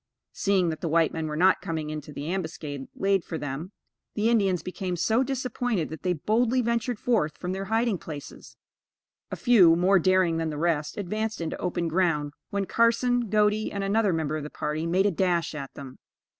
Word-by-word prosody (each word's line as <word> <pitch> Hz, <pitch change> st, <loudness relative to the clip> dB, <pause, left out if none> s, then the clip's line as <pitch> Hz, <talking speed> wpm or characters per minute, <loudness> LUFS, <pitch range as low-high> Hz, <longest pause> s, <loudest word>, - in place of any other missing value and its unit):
Seeing 190 Hz, -3 st, +1 dB
that 155 Hz, -1 st, -4 dB
the 165 Hz, -, -2 dB
white 165 Hz, 0 st, +3 dB
men 160 Hz, -1 st, -3 dB
were 150 Hz, -, -4 dB
not 185 Hz, +3 st, +4 dB
coming 155 Hz, -2 st, -3 dB
into 150 Hz, -1 st, -6 dB
the 145 Hz, 0 st, -6 dB
ambuscade 160 Hz, -6 st, -4 dB
laid 195 Hz, -2 st, +1 dB
for 165 Hz, -, -5 dB
them, 145 Hz, +5 st, -5 dB, 0.4 s
the 215 Hz, +2 st, +2 dB
Indians 195 Hz, -6 st, +2 dB
became 185 Hz, 0 st, -4 dB
so 220 Hz, +8 st, +2 dB
disappointed 250 Hz, -, -1 dB
that 160 Hz, -, -8 dB
they 180 Hz, -1 st, +1 dB
boldly 225 Hz, -, +1 dB
ventured 235 Hz, 0 st, -1 dB
forth 210 Hz, -11 st, 0 dB
from 180 Hz, -, -4 dB
their 190 Hz, +1 st, -3 dB
hiding 225 Hz, -2 st, +1 dB
places. 145 Hz, -3 st, -9 dB, 0.7 s
A -, -, -4 dB
few, 190 Hz, -10 st, +6 dB
more 185 Hz, +3 st, +4 dB
daring 185 Hz, -1 st, +3 dB
than 165 Hz, -1 st, -1 dB
the 150 Hz, -, -5 dB
rest, 155 Hz, -2 st, -1 dB
advanced 215 Hz, +3 st, -3 dB
into 165 Hz, -2 st, -3 dB
open 175 Hz, -1 st, -2 dB
ground, 160 Hz, -4 st, 0 dB, 0.2 s
when 200 Hz, -1 st, -1 dB
Carson, 235 Hz, +1 st, +2 dB
Godey, 210 Hz, +1 st, +2 dB
and 200 Hz, -1 st, -3 dB
another 205 Hz, +1 st, +2 dB
member 155 Hz, -2 st, -1 dB
of 155 Hz, -, -5 dB
the 150 Hz, -, -6 dB
party, 155 Hz, +2 st, -3 dB
made 185 Hz, +3 st, +2 dB
a 205 Hz, -, +3 dB
dash 175 Hz, -2 st, 0 dB
at 140 Hz, -3 st, -6 dB
them. 135 Hz, -2 st, -10 dB
180 Hz, 195 wpm, -26 LUFS, 160-210 Hz, 0.7 s, few